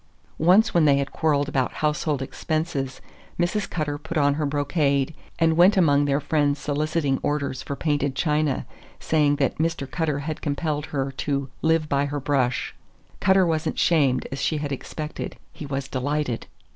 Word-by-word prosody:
Once 190 +8 +5
when 170 -3 +4
they 140 -2 +5
had 140 0 -2
quarreled 145 -3 +1
about 135 -3 0
household 150 -2 0
expenses, 155 -2 -3 0.4
Mrs. 185 +4 0
Cutter 145 -3 -2
put 160 +2 -5
on 145 -1 +4
her 150 0 -1
brocade 145 0 +1 0.2
and 165 -1 +3
went 185 +5 +6
among 145 -5 +4
their 140 0 +1
friends 145 -1 +1
soliciting 150 -1 0
orders 140 -3 -1
for 140 - -5
painted 145 -3 0
china, 150 -1 0 0.3
saying 150 -2 +2
that 140 -2 -1
Mr. 160 -3 0
Cutter 155 -1 -1
had 155 +1 -4
compelled 150 0 -2
her 135 -1 -2
"to 140 -2 -2
live 160 -1 +2
by 140 -1 +1
her 145 0 -3
brush." 130 -3 0 0.5
Cutter 190 -1 +4
was 160 -2 0
n't - - -6
shamed 140 -7 +3
as 135 - -4
she 155 - +1
had 145 -1 -3
expected; 150 +3 -5 0.2
he 150 - -8
was 135 -1 -3
delighted! 140 -2 -2
145 Hz, 170 wpm, -24 LUFS, 140-160 Hz, 0.5 s, went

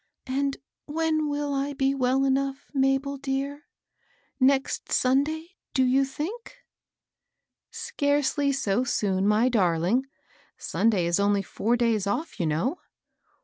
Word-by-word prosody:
"And 275 +1 -1 0.3
when 310 0 0
will 290 0 -2
I 280 +1 -1
be 270 -1 +1
well 265 0 +1
enough, 275 +1 -1
Mabel 270 +1 +1
dear? 275 +2 -3 0.4
— 485 0 -38
next 270 +1 +1
Sunday, 295 +6 +1 0.3
do 260 - +4
you 265 +2 +3
think?" 340 - -6 0.6
" - - -58 0.2
Scarcely 285 - 0
so 240 -4 0
soon, 200 -5 0
my 215 +4 +4
darling. 200 +2 +2 0.5
Sunday 210 -6 +1
is 170 +2 +1
only 200 0 +2
four 230 +5 0
days 225 -4 +1
off, 300 +7 -3
you 170 - +1
know." 220 - -1
270 Hz, 130 wpm, -26 LUFS, 230-285 Hz, 0.6 s, do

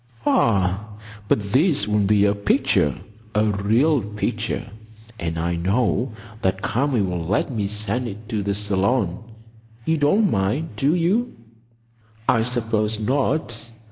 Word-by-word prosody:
"Ah, 100 0 +1 0.3
but 100 -1 0
this 140 - +3
will 105 0 +1
be 100 0 +3
a 100 - +3
picture,—a 105 +1 0
real 110 +8 +2
picture; 105 0 -3 0.5
and 85 -1 -3
I 85 +1 -1
know 110 +7 0 0.3
that 95 0 0
Kami 125 -1 +1
will 90 -3 -2
let 95 +10 0
me 105 -5 -1
send 105 +4 -2
it 105 0 -8
to 110 -2 -1
the 100 0 -1
Salon. 100 0 0 0.6
You 160 - +2
don't 190 +9 +3
mind, 105 +12 0
do 145 +4 +2
you?" 195 +8 +1 0.9
"I 115 - +4
suppose 110 -3 0
not. 125 -1 -1
105 Hz, 130 wpm, -22 LUFS, 100-125 Hz, 0.9 s, I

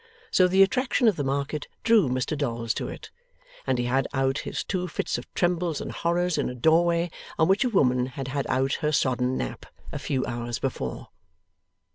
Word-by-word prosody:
So, 185 - +5
the 190 +2 +6
attraction 250 +3 +2
of 215 - +4
the 145 - -2
Market 140 +2 -2 0.2
drew 220 - +4
Mr 130 +4 -1
Dolls 115 -5 -1
to - - -3
it, - - -9 0.6
and 130 - +2
he 120 - 0
had 130 +2 +1
out 135 +1 +1
his - - -4
two 180 -1 -2
fits 145 - -2
of 120 - -13
trembles 175 -3 0
and - - -5
horrors 175 0 0
in - - 0
a 125 - -6
doorway 170 +5 +3 0.3
on 160 - +4
which 195 +5 +3
a 255 - +1
woman 125 - +2
had 130 0 -6
had 140 0 -2
out 135 +1 +1
her 150 - +1
sodden 130 -3 +1
nap - - -5 0.2
a - - -4
few 130 -2 -1
hours 120 0 -3
before. 65 - -4
140 Hz, 195 wpm, -26 LUFS, 130-175 Hz, 0.6 s, the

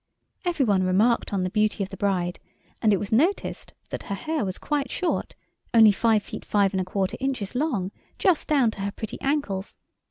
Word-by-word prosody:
Every 340 -6 +1
one 200 -4 +3
remarked 200 +6 +2
on 195 -2 0
the 185 - -2
beauty 215 0 +1
of 190 - -5
the 195 - -7
bride, 185 -3 -1 0.4
and 220 - +4
it 200 - +4
was 200 +1 -5
noticed 320 - 0
that - - -4
her 200 - -3
hair 310 +9 -2
was 190 -2 -3
quite 285 -3 -1
short—only 230 - +2
five 220 0 +2
feet - - -8
five 200 -1 +2
and 190 - +1
a - - -3
quarter 190 +1 -1
inches 260 -7 -2
long—just 275 - -1
down 270 -7 +3
to 205 - -8
her 200 +1 -1
pretty 220 +1 -7
ankles. 270 -9 -1
210 Hz, 190 wpm, -25 LUFS, 195-270 Hz, 0.4 s, and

